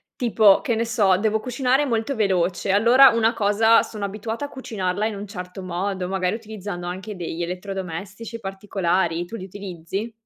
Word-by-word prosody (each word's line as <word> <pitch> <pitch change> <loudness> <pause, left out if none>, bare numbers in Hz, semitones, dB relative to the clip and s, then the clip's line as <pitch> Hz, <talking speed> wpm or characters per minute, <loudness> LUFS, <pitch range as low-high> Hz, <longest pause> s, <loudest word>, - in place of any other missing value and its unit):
Tipo, 220 -6 +4
che 250 -7 0
ne 230 +1 0
so, 200 -5 +3
devo 220 +1 +1
cucinare 260 +3 +1
molto 230 +2 -1
veloce, 190 -3 0
allora 240 +7 +7
una 230 -1 +2
cosa 220 +1 +4
sono 210 -2 -5
abituata 220 +6 -4
a 285 - -8
cucinarla 210 -5 -2
in 220 - -4
un 200 +1 -6
certo 180 -1 -8
modo, 185 +1 -3
magari 190 +1 0
utilizzando 205 -5 -7
anche 190 +4 -5
degli 175 -1 -5
elettrodomestici 190 +4 -5
particolari, 190 -4 -1
tu 225 - -8
li 190 - -6
utilizzi? 195 +2 -6
200 Hz, 165 wpm, -23 LUFS, 185-225 Hz, -, allora